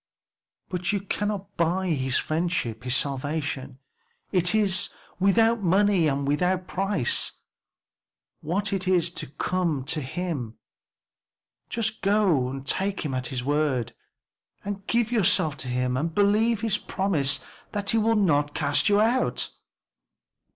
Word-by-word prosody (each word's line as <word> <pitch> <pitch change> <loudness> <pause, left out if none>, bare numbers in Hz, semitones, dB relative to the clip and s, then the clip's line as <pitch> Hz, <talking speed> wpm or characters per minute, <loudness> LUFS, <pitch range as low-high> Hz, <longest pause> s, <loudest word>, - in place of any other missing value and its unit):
"But 180 +1 -2
you 200 -2 -1
cannot 205 0 -3
buy 180 +3 +1
his 130 -4 0
friendship 155 -8 -1
his 125 0 +1
salvation; 140 -1 -1 0.5
it 180 +1 +3
is 200 -3 +2 0.3
'without 225 +4 +3
money 190 -1 +3
and 140 -1 -1
without 180 +5 +1
price.' 195 -9 0 1.1
What 200 +6 -1
is 185 -3 +2
it - - -24
to 155 - -2
come 160 0 -1
to 150 +3 -2
him? 135 -5 -4 1.1
Just 220 -1 -2
to 160 -11 +1
take 195 +7 -1
him 140 - -2
at 130 0 -2
his 130 -3 -3
word, 140 -4 0 0.9
give 235 -1 +1
yourself 185 - +3
to 130 - -5
him 125 0 -1
and 160 +5 -2
believe 210 +2 +3
his 220 -3 0
promise 155 -8 0 0.3
that 205 -1 0
he 225 - +3
will 225 +1 +2
not 145 -8 +2
cast 145 +5 +2
you 205 0 +4
out." 235 +4 +1
180 Hz, 130 wpm, -25 LUFS, 140-200 Hz, 1.1 s, you